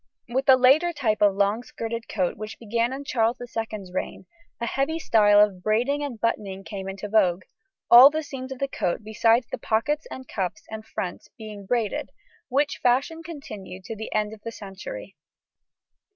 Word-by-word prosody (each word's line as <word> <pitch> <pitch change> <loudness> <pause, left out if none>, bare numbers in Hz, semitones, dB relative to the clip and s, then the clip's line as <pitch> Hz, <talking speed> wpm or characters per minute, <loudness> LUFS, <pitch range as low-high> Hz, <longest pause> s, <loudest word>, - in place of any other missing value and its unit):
With 260 +3 -1
the 265 -1 +8
later 275 +7 +5
type 235 -8 0
of 205 -2 +5
long 200 +3 +1
skirted 230 -1 -6
coat 185 -4 0
which 215 +1 -7
began 230 +2 -1
in 270 +2 -5
Charles 235 -2 0
II's 220 -5 -5
reign, 185 - -4 0.3
a 235 - -2
heavy 275 +7 -1
style 210 -9 +4
of 205 -3 +3
braiding 240 +8 +1
and 260 -6 -5
buttoning 200 -4 -2
came 195 -2 -6
into 195 +2 -6
vogue, 190 -4 +2 0.5
all 250 +3 +11
the 310 +1 -3
seams 265 -2 -7
of 265 - -5
the 275 - -1
coat 175 -8 -2
besides 225 +3 +2
the - - -4
pockets 295 +8 0
and 260 -1 -8
cuffs 180 -5 -3
and 220 0 -7
fronts 180 -2 -5
being 210 -3 -9
braided, 230 -3 -1 0.4
which 285 +3 +1
fashion 270 +7 +1
continued 215 - -9
to 225 - -6
the 220 +1 -7
end 215 0 0
of 215 - -12
the 230 - -6
century. 205 - -9
225 Hz, 180 wpm, -25 LUFS, 205-260 Hz, 0.5 s, all